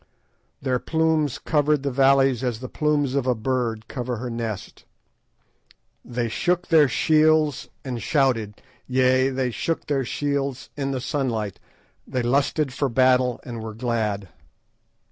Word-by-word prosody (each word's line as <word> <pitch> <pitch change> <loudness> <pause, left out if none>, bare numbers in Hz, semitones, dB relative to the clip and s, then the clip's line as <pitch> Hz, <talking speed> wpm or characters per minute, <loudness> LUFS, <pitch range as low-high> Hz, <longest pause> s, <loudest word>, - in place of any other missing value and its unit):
"Their 130 -2 +1
plumes 160 -3 +1
covered 150 -2 +1
the 140 - -1
valleys 135 -1 +3
as 120 -4 -1
the 130 - -6
plumes 145 -1 0
of 135 -2 0
a 125 - +3
bird 115 -1 -2
cover 125 -2 -4
her 120 +2 -5
nest; 115 -4 -5 1.2
they 120 -1 -2
shook 175 +10 -1
their 155 -3 +6
shields 155 +1 +2 0.2
and 125 -3 -4
shouted, 120 -8 0 0.2
yea, 130 +1 +3
they 130 -2 -1
shook 165 +7 -2
their 140 -2 0
shields 140 0 -2
in 140 -1 -2
the 130 -2 -2
sunlight; 120 - -2 0.5
they 125 -1 -2
lusted 140 +2 +1
for 135 +1 0
battle 125 0 +3
and 120 -3 -6
were 110 -1 -7
glad. 110 -5 -2
130 Hz, 140 wpm, -24 LUFS, 120-140 Hz, 1.2 s, their